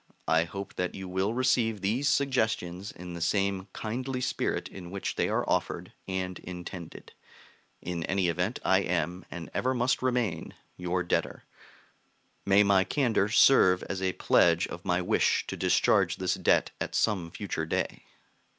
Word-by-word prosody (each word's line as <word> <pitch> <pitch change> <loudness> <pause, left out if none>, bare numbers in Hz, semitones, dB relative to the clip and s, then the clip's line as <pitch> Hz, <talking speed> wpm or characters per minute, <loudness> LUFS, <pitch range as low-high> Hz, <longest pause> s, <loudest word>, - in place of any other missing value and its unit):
I 80 +2 +3
hope 100 +4 -7
that 90 -1 -2
you 95 -1 -6
will 95 +4 -1
receive 120 -4 +2
these 120 +9 +1
suggestions 110 -9 0
in 90 0 -9
the 85 - -7
same 95 +1 0
kindly 130 +4 -4
spirit 125 0 -1
in 90 -2 -10
which 100 +1 -3
they - - 0
are - - 0
offered - - -1
and 95 -1 -3
intended. 90 -1 -9 0.7
In 85 -2 -3
any 95 -1 +1
event 90 +7 -1
I 95 0 +4
am, 90 -1 -2
and 85 -2 -8
ever 130 +1 0
must 125 +2 +1
remain, 120 -10 -1 0.2
your 90 0 -1
debtor. 85 - -1 1.0
May 100 +1 +6
my 100 -2 +4
candor 115 -2 +1
serve 95 -6 +5
as 95 -1 -4
a 95 -1 0
pledge 85 0 +3
of 85 - -8
my 90 -1 +1
wish - - +2
to - - -5
discharge - - +2
this - - 0
debt - - +2
at - - -3
some 95 -6 +1
future - - -4
day! - - -2
95 Hz, 160 wpm, -28 LUFS, 90-110 Hz, 1.0 s, May